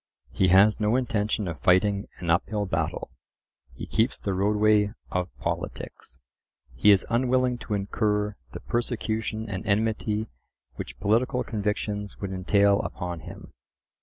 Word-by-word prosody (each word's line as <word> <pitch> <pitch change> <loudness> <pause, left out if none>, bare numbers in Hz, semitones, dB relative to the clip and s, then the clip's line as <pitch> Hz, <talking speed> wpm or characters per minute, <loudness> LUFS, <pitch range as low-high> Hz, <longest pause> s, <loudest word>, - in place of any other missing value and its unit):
He 95 - +2
has 100 +4 +6
no 105 +2 +2
intention 110 -5 0
of 85 -2 -5
fighting 100 +2 +3
an 85 -2 -1
uphill 100 +4 +1
battle; 80 -4 -2 0.6
he - - -6
keeps 115 +3 +1
the 100 - -3
roadway 105 +1 +3 0.2
of 90 -1 -1
politics. - - -5 0.5
He 65 +12 +3
is 100 -2 +6
unwilling 125 0 +2
to 105 - -3
incur 105 +1 0 0.2
the - - -8
persecution 110 -2 -2
and 95 -3 -4
enmity 110 0 0 0.5
which - - -8
political 125 +4 +1
convictions 105 -2 -3
would 100 -1 -4
entail 100 +2 +3
upon 90 -2 -4
him. 80 - -11
105 Hz, 135 wpm, -26 LUFS, 95-110 Hz, 0.6 s, has